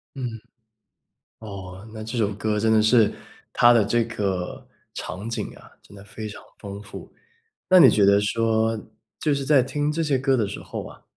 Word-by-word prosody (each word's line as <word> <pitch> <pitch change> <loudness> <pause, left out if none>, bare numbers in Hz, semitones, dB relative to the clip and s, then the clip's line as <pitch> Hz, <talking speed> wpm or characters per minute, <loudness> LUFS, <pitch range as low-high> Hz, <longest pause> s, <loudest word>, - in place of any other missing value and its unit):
嗯。 130 -2 -4 1.1
哦， 100 -1 -9
那 110 0 -7
这 115 +2 -5
首 105 -2 +1
歌 105 0 -1
真 110 +1 +2
的 110 - +5
是 110 0 +4 0.4
它 120 0 +6
的 115 -4 +4
这 120 +2 +2
个 95 -6 -4 0.3
场 100 +5 -6
景 115 -2 -4
啊， - - -16
真 100 - -16
的 100 - -12
非 110 +1 -8
常 105 - -9 0.2
丰 100 -1 -8
富。 - - -11 0.6
那 185 - +7
你 135 -7 +9
觉 100 -2 +4
得 100 0 +5
说， 110 +1 +1 0.4
就 150 -2 +1
是 140 -1 -3
在 140 -2 +5
听 145 +3 -1
这 165 +2 -2
些 145 -4 +1
歌 130 +1 +2
的 110 -5 0
时 100 - -6
候 - - -6
啊， - - -15
110 Hz, 205 characters per minute, -24 LUFS, 100-125 Hz, 1.1 s, 你